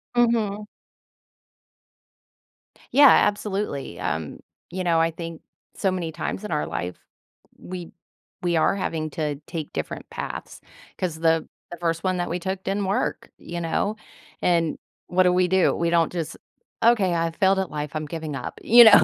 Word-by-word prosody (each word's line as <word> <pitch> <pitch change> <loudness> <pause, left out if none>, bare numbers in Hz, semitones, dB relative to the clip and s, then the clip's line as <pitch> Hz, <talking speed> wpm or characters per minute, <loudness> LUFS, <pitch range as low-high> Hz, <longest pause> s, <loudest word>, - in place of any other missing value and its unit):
Mhm. 225 -4 +2 2.3
Yeah, 285 +1 +9
absolutely, 205 - +2
um, 80 -2 -3 0.3
you 185 +2 -3
know, 170 -2 +3
I 165 0 +3
think 165 0 -7 0.3
so 195 - +1
many 175 -3 -2
times 165 +5 -4
in 210 - -5
our 150 -1 0
life, 90 +1 -4 0.6
we 180 -2 -7 0.5
we 175 -1 +2
are 160 - +3
having 160 -5 -2
to 150 -3 -2
take 160 -3 -5
different - - -5
paths, - - -6 0.4
'cause 180 -4 -2
the 160 0 +2 0.2
the 175 - -6
first 165 -1 -1
one 185 -1 +1
that 175 - -1
we 175 - -1
took 190 +1 -3
didn't 200 +1 0
work, 195 +2 -1
you 170 0 -6
know? 185 +5 0 0.5
And 170 -3 +2 0.3
what 185 +1 +3
do 180 - +4
we 180 0 +3
do? 190 0 +3
We 170 0 0
don't 170 -1 +3
just, 170 -3 -4 0.5
"Okay, 215 -6 +4
I 165 0 +1
failed 190 +3 +3
at 190 - -2
life, 150 0 -4
I'm 155 0 -2
giving 155 -1 -5
up," - - -6
you 240 +2 +9
know 220 -2 +9
175 Hz, 165 wpm, -24 LUFS, 165-190 Hz, 2.3 s, Yeah